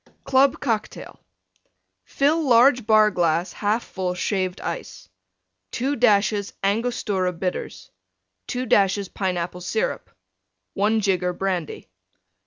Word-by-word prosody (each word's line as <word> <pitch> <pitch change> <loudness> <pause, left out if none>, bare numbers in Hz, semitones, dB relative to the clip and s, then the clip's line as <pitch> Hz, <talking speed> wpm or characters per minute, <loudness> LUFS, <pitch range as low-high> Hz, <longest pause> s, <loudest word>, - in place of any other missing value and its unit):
CLUB 270 +1 +3
COCKTAIL 225 -5 -4 0.9
Fill 300 +4 +1
large 245 -3 +4
Bar 215 -1 +5
glass 175 -1 0
1/2 215 +3 -1
full 185 -2 -4
Shaved 185 0 -2
Ice. - - -6 0.7
2 270 +4 -1
dashes 210 -3 +2
Angostura 200 -3 0
Bitters. 180 +1 -5 0.6
2 250 +1 -3
dashes 200 -3 +2
Pineapple 180 -2 -3
Syrup. 450 - -2 0.6
1 215 +2 +1
jigger 185 -3 0
Brandy. 180 -3 -3
205 Hz, 100 wpm, -23 LUFS, 185-240 Hz, 0.9 s, Bar